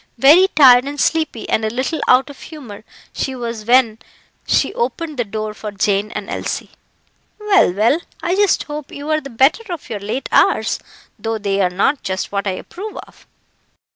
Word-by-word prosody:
Very 305 +10 +7
tired 255 -3 +7
and 285 +1 -6
sleepy, 315 -8 0
and 220 - 0
a 220 - 0
little 260 +7 -3
out 260 +3 +4
of 280 - -15
humour, 250 -11 -11 0.3
she 265 - -3
was 230 -3 -5
when 235 -2 +3 0.5
she - - +1
opened 335 - -3
the - - +2
door 215 0 -5
for 215 0 -7
Jane 200 +1 0
and - - -5
Elsie. - - -4 0.7
"Well, 405 - +3
well! 220 - +2 0.2
I 350 +2 0
just 405 -1 +2
hope 295 -1 -7
you're 310 +2 -2
the 275 - -9
better 270 - +2
of 340 -8 -7
your 210 - -3
late 220 +7 -4
hours, - - +2 0.4
though 225 0 -2
they 200 -1 -1
are 185 - +2
not 200 +10 0
just 190 0 -4
what 200 0 -2
I 190 - 0
approve 410 +4 -8
of." - - -13
255 Hz, 180 wpm, -18 LUFS, 215-305 Hz, 0.7 s, Very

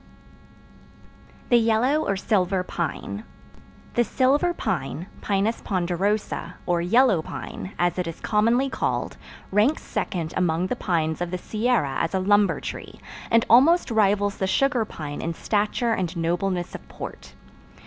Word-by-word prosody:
The 240 - +6
Yellow 235 +7 +2
Or 195 - 0
Silver 190 -2 +1
Pine 160 - -4 0.7
The 240 - +3
Silver 275 - +2
Pine 160 - -3 0.2
(Pinus 205 +3 0
ponderosa), 190 +3 -1
or 175 -1 +1
Yellow 215 0 +4
Pine, 185 +4 -7
as 175 +1 +1
it 180 - -1
is 165 - -6
commonly 230 +5 +2
called, - - -2 0.3
ranks 215 +10 +2
second 165 -3 -3
among 175 -1 +1
the 220 - -2
pines 165 -7 -1
of 175 - -1
the 180 - -3
Sierra 215 - 0
as 165 - -1
a - - +2
lumber 205 +2 +3
tree, - - -7 0.3
and 230 0 +4
almost 275 +6 +5
rivals 205 -2 +2
the 190 - -1
sugar 255 +2 +2
pine 150 -7 -6
in 165 0 -3
stature 215 +5 0
and 180 -4 -2
nobleness 175 +2 -1
of - - -9
port. - - -9
200 Hz, 140 wpm, -24 LUFS, 175-230 Hz, 0.7 s, The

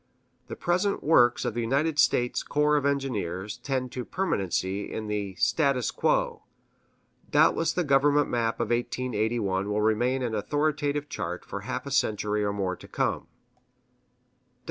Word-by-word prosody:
The - - -6
present 185 +3 0
works 125 -6 +4
of 120 - -1
the 120 - -2
United 145 +6 0
States 120 0 +2
Corps 150 0 +1
of 145 -1 +2
Engineers 105 -8 -2
tend 130 -1 -2
to 125 - -4
permanency 100 - -2
in 110 - -4
the 105 -2 -3
status 140 - +1
quo; - - 0 0.9
doubtless - - +3
the 180 - 0
government 145 0 +3
map 115 -2 0
of - - -1
1881 110 -5 -1
will 105 0 0
remain 120 +5 +1
an 120 -2 -2
authoritative 145 +5 -1
chart 90 -9 -5
for 100 - -5
a 100 - -12
half 130 +2 -4
century 105 -4 +1
or 100 - 0
more 95 -2 -2
to - - -14
come. - - -1
125 Hz, 145 wpm, -27 LUFS, 105-145 Hz, 0.9 s, works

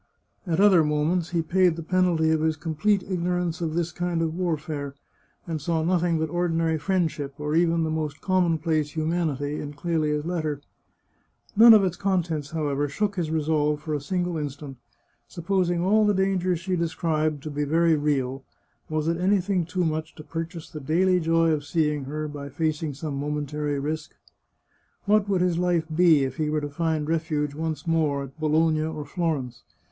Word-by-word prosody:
At 165 0 0
other 195 -5 +6
moments 155 +3 0
he 170 -2 0
paid 180 +1 +3
the 165 - -6
penalty 175 -2 +2
of 160 -1 +1
his 160 0 +1
complete 170 +6 0
ignorance 180 -1 -1
of 160 -2 -2
this 170 0 -1
kind 175 -1 -1
of 160 -1 -1
warfare, 155 -5 -3 0.5
and 160 -3 -4
saw 160 +1 0
nothing 175 -1 +1
but 160 0 0
ordinary 165 -2 0
friend 175 +1 +1
ship, 140 -2 -6
or 150 0 -3
even 165 0 +3
the 160 - -1
most 155 -2 -3
commonplace 165 -5 +1
humanity, 155 -3 -1
in 145 0 -6
Clelia's 150 -1 -1
letter. 155 -4 -2 1.0
None 225 +2 +9
of 210 - +5
its 180 -2 -1
contents, 170 -7 -1
however, 145 -3 -1
shook 205 +7 -1
his 170 -4 -2
resolve 150 -1 +1
for 155 0 -4
a 145 - -1
single 175 +2 -2
instant. 145 -2 -6 0.5
Supposing 175 -1 0
all 210 +4 +3
the 205 -1 +3
dangers 185 -2 +1
she 180 +2 -2
described 155 -3 -1
to 155 - -5
be 145 +1 -1
very 165 +2 +3
real, 135 -3 -1 0.5
was 155 0 -1
it 165 0 +1
anything 185 -1 +1
too 180 0 -1
much 155 0 -3
to 155 - -10
purchase 165 +1 -6
the 155 - -8
daily 180 +6 +2
joy 165 0 +2
of 150 -2 0
seeing 150 -2 0
her 155 +2 -4
by 145 -1 -7
facing 155 0 -2
some 150 +1 -5
momentary 150 0 -2
risk? 155 +3 -4 0.9
What 205 0 +3
would 190 -3 +2
his 180 -2 +1
life 175 -2 +1
be 165 -4 +5
if 130 -1 -3
he 155 -1 0
were 150 0 0
to 145 - -4
find 155 0 -1
refuge, 155 -3 -1
once 160 +1 -4
more, 155 -4 +1
at 135 +3 -12
Bologna 155 0 +2
or 155 -1 -4
Florence 140 -6 -2
160 Hz, 180 wpm, -25 LUFS, 150-175 Hz, 1.0 s, None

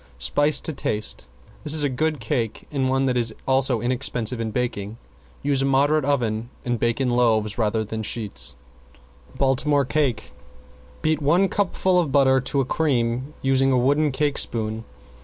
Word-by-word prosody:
Spice 145 - +1
to 160 - -3
taste. 105 - -2 0.3
This 150 +1 -1
is 155 - +3
a - - +3
good 150 +3 -1
cake 115 -4 -2
and 135 -3 0
one 135 +1 +1
which 125 -1 +1
is 115 -2 +1
also 130 -3 +2
inexpensive 125 -1 -1
in 115 -1 -2
baking. 110 -2 -3 0.5
Use 140 -1 +1
a - - +1
moderate 140 +2 +2
oven 120 -5 -1 0.2
and 120 -2 -1
bake 115 +1 0
in 130 -2 +1
loaves 115 -3 +1
rather 110 0 +1
than 110 +1 -5
sheets. 100 - -2 0.8
~BALTIMORE 140 +1 +2
CAKE~ 135 -5 -1 0.7
Beat 155 -1 +1
one 170 +7 +3
cupful 185 -2 +1
of 160 -6 0
butter 130 -1 +4
to 135 +2 0
a - - -1
cream, 130 -1 -1
using 135 0 +3
a 130 - +3
wood 145 +4 +2
cake 145 +2 0
spoon. 110 -1 -2
130 Hz, 165 wpm, -23 LUFS, 115-145 Hz, 0.8 s, butter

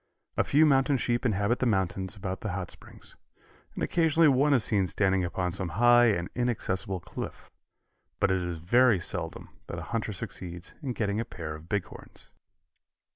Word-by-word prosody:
A - - +2
few 150 +3 +4
mountain 135 -1 +3
sheep 120 0 0
inhabit 105 +2 +1
the 130 - +1
mountains 95 -1 0
about 95 -2 -5
the 105 -5 -3
Hot 90 -2 -4
Springs, - - -13 0.6
and - - -3
occasionally 165 -1 +3
one 140 +2 +3
is 130 -6 +4
seen 100 -4 +2
standing 95 +1 +1
upon 90 +1 -2
some 95 0 -2
high 120 +1 +6
and 90 -6 +1
inaccessible 100 -6 -1
cliff, 80 - -8 0.7
but 100 - +2
it 95 -1 +1
is 90 -1 -3
very 115 +6 +4
seldom - - -4 0.2
that - - -6
a - - -5
hunter 110 -1 -1
succeeds 90 -2 -7
in 130 -4 -3
getting 105 -2 -1
a - - 0
pair 85 -7 -7
of 80 +2 -11
big 100 -3 0
horns. - - -12
100 Hz, 180 wpm, -28 LUFS, 90-120 Hz, 0.7 s, high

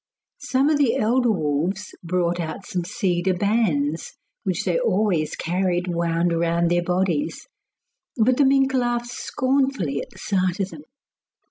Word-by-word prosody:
Some 270 +2 +1
of 295 - +2
the 270 -5 +3
elder 240 +3 +2
wolves 175 +2 -1
brought 175 0 0
out 165 +4 -5
some 180 -1 -3
cedar 185 -2 0
bands, 175 -7 0 0.3
which - - -1
they - - +1
always 205 - +1
carried 180 +1 0
wound 170 0 0
round 170 0 +1
their 175 0 +3
bodies, 185 - -1 0.7
but 245 +2 +3
the 285 - +5
mink 270 0 +3
laughed 240 -1 0
scornfully 260 - 0
at - - -9
the - - -18
sight 185 -1 0
of 195 -1 -1
them. - - -10
185 Hz, 145 wpm, -23 LUFS, 170-240 Hz, 0.7 s, the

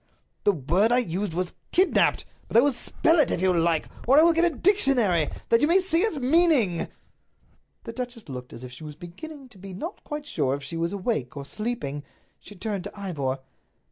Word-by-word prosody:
"The 205 - +6
word 180 - +1
I 245 - +4
used 195 -5 -2
was 180 0 -2 0.2
'kidnaped.' 370 +1 +3 0.2
But - - +1
I - - +8
will 285 +2 +3
spell 325 +6 +1
it 300 - +4
if - - -1
you 185 0 +3
like. 165 -2 +1 0.2
Or 270 +3 +6
I - - +7
will 335 0 +5
get 340 +1 +3
a - - -11
dictionary, 245 - +3 0.2
that 230 0 +4
you 295 - +4
may 345 +3 +5
see 370 -3 +2
its 415 -4 +2
meaning." 270 - +3 1.0
The 230 - -7
duchess 240 -3 -6
looked 125 -2 -8
as 115 - -10
if 125 - -8
she 125 +5 -11
was 150 -1 -8
beginning 270 - -10
to 210 -6 -17
be 190 0 -9
not 330 - -7
quite 295 0 -6
sure 140 - 0
if 140 - -8
she 140 +4 -7
was 165 +1 -1
awake 185 - -3
or 140 - -6
sleeping. 150 - -4 0.4
She 205 - -13
turned 200 -1 -4
to - - -9
Ivor. 145 -10 -2
"Mr. - - -26
205 Hz, 215 wpm, -25 LUFS, -, 1.0 s, I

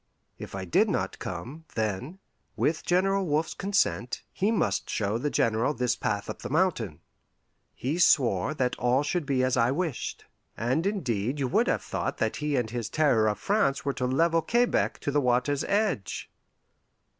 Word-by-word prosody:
If - - -7
I 95 -1 -4
did 85 - +3
not - - -2
come, 120 - -6
then, 110 - -2 0.4
with 155 +1 0
General 195 +2 +2
Wolfe's 155 -1 0
consent, 195 - 0
he 200 +3 +1
must 225 - 0
show 105 +2 -1
the 145 +4 -1
General 115 +3 +1
this 125 -1 +1
path 100 -1 -2
up - - -6
the 120 - -5
mountain. 135 - 0 0.7
He 145 +7 -2
swore 125 - +3
that 125 -3 0
all 125 +3 +2
should 150 0 -1
be 130 -3 +2
as 130 0 +2
I 120 -1 +3
wished; 155 -1 -3 0.3
and 130 - 0
indeed 130 - -1
you 135 -2 0
would - - +2
have - - 0
thought - - -3
that 110 - -1
he 150 0 -1
and 120 -4 -1
his 115 -3 -3
Terror 125 -7 +3
of 105 - 0
France 155 -9 +1
were 140 - 0
to 125 - -1
level 165 +5 +2
Quebec 240 +7 +1
to 145 - -1
the 145 +1 +2
water's 125 +3 +1
edge. 200 - -1
135 Hz, 175 wpm, -27 LUFS, 115-165 Hz, 0.7 s, did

